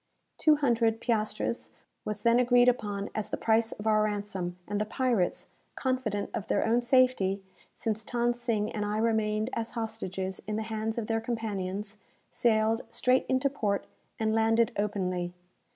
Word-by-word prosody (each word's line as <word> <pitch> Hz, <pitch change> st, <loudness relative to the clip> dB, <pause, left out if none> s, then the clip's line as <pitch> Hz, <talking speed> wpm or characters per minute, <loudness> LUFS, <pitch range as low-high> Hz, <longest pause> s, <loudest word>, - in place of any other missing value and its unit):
Two 310 Hz, -1 st, +6 dB
hundred 230 Hz, -5 st, +2 dB
piastres 220 Hz, -1 st, -1 dB, 0.4 s
was 210 Hz, -1 st, -4 dB
then 235 Hz, 0 st, +5 dB
agreed 245 Hz, 0 st, +5 dB
upon 205 Hz, -5 st, 0 dB
as 215 Hz, -, -3 dB
the -, -, -2 dB
price 225 Hz, 0 st, +2 dB
of 210 Hz, -, -8 dB
our 215 Hz, -1 st, +4 dB
ransom, 200 Hz, -4 st, -2 dB
and 205 Hz, 0 st, -1 dB
the -, -, +1 dB
pirates 235 Hz, -6 st, 0 dB, 0.3 s
(confident 255 Hz, -6 st, -1 dB
of 210 Hz, -, -4 dB
their -, -, +1 dB
own 235 Hz, +2 st, +3 dB
safety, 240 Hz, -6 st, +3 dB, 0.3 s
since 220 Hz, -1 st, -3 dB
Than 240 Hz, +1 st, 0 dB
Sing 230 Hz, -3 st, -1 dB
and 210 Hz, -, -2 dB
I 210 Hz, +1 st, -1 dB
remained 220 Hz, 0 st, +1 dB
as 230 Hz, 0 st, -3 dB
hostages 190 Hz, -4 st, -3 dB
in 215 Hz, -, -2 dB
the 220 Hz, -, -1 dB
hands 220 Hz, 0 st, -3 dB
of 230 Hz, -, -1 dB
their 225 Hz, 0 st, 0 dB
companions) 210 Hz, -3 st, -3 dB, 0.3 s
sailed 225 Hz, 0 st, +2 dB
straight 250 Hz, +2 st, +2 dB
into 260 Hz, +2 st, +2 dB
port, 210 Hz, -8 st, -1 dB, 0.3 s
and 220 Hz, -1 st, +1 dB
landed 225 Hz, 0 st, +3 dB
openly. 185 Hz, -4 st, -1 dB
220 Hz, 160 wpm, -29 LUFS, 205-235 Hz, 0.4 s, Two